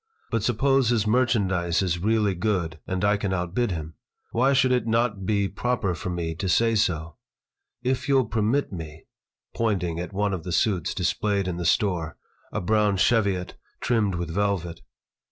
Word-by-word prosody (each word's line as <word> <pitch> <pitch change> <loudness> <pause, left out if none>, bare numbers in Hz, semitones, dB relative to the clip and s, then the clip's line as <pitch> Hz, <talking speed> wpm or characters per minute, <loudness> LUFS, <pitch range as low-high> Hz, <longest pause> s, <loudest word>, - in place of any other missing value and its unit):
"But 115 -2 +1
suppose 130 +3 +2
his 115 -4 +2
merchandise 100 -7 +1
is 90 -2 -1
really 105 +1 +2
good, 90 -4 -1
and 95 +1 -1
I 105 +1 +3
can 100 -2 -2
outbid 90 +7 -1
him. 80 -3 -5 0.4
Why 130 +4 +3
should 135 -1 +3
it 125 -3 +1
not 110 -4 0
be 100 -2 +2
proper 115 0 -1
for 85 - -5
me 85 -2 -2
to 95 - -2
say 115 +6 +3
so? 85 -7 0 0.7
If 130 +1 -1
you'll 135 -2 +4
permit 115 +5 0
me" 80 -2 -8 0.5
pointing 90 -7 -1
at 90 +2 -5
one 100 0 0
of 90 - -3
the 90 - -5
suits 90 -1 +1
displayed 100 -3 0
in 90 -2 -3
the 90 - -4
store, 85 -3 +1 0.3
a - - -2
brown 105 +1 +2
cheviot 100 -4 +1 0.2
trimmed 110 -6 +1
with 85 -1 -3
velvet. 95 -3 -1
100 Hz, 170 wpm, -25 LUFS, 90-115 Hz, 0.7 s, you'll